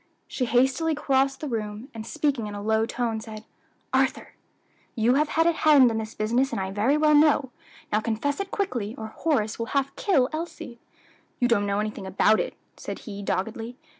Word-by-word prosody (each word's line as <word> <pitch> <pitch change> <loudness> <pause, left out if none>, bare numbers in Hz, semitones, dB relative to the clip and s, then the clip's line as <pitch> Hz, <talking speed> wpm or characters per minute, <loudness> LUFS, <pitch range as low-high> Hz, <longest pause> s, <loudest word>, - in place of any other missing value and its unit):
She 255 - -2
hastily 265 +7 +2
crossed 270 -2 +1
the 305 - -3
room, 220 0 -4
and 225 0 -7
speaking 285 -7 -1
in 205 - -6
a 205 - -5
low 220 +1 +1
tone, 230 -3 -2
said, 215 -1 -9 0.5
"Arthur, - - 0 0.6
you 235 +1 +3
have 300 +3 +2
had 325 - +4
a 340 - +5
hand 295 -6 +5
in 225 - -1
this 220 0 -6
business 240 +6 +1
I 190 -1 -2
very 220 +9 +2
well 305 0 +4
know; 295 -3 +4 0.4
now 210 - +3
confess 230 - -2
it 395 -1 -3
quickly, 240 - -2
or 220 -1 -6
Horace 235 -10 0
will 230 - -2
half 275 0 -1
kill 275 -11 +2
Elsie." 310 -7 -6 0.6
"You 245 - +3
don't 205 -4 +2
know 200 0 0
anything 210 -2 -4
about 205 +3 +3
it," - - -3 0.2
said - - -6
he 205 -3 -7
doggedly. 225 +5 -3
240 Hz, 190 wpm, -25 LUFS, 215-285 Hz, 0.6 s, a